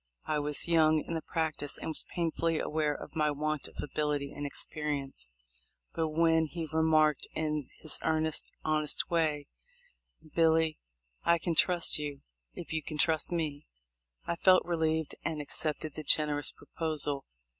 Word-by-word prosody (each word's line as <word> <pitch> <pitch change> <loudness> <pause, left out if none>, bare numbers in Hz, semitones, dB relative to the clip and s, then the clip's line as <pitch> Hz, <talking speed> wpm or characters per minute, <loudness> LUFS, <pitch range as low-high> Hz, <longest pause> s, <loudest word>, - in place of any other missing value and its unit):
I 155 -1 0
was 145 +2 0
young 155 -2 +4
in - - -4
the 165 - -1
practice 155 -4 -2
and - - -5
was 160 - 0
painfully 165 -1 0
aware 150 -1 0
of - - -10
my 150 -1 +2
want 150 0 -1
of - - -16
ability 145 -1 -1
and 145 0 -3
experience; 140 - -3 0.7
but 160 -1 0
when 160 0 +3
he 165 +1 -5
remarked 155 -2 +3
in 150 -3 -2
his 155 - 0
earnest, 160 -1 0
honest 155 +1 +1
way, 155 -4 +1 0.9
"Billy, 160 -1 +3 0.4
I 170 - +4
can 170 0 -1
trust 175 -1 +3
you, 145 -2 -5 0.3
if - - -7
you 160 - 0
can 155 +1 -6
trust 160 +2 +2
me," 155 -4 -2 0.6
I 170 - -1
felt 185 +1 +5
relieved, 160 -2 0
and 160 -1 -2
accepted 150 +1 -2
the - - -6
generous 150 -1 +2
proposal. 150 -4 0
155 Hz, 150 wpm, -31 LUFS, 150-160 Hz, 0.9 s, felt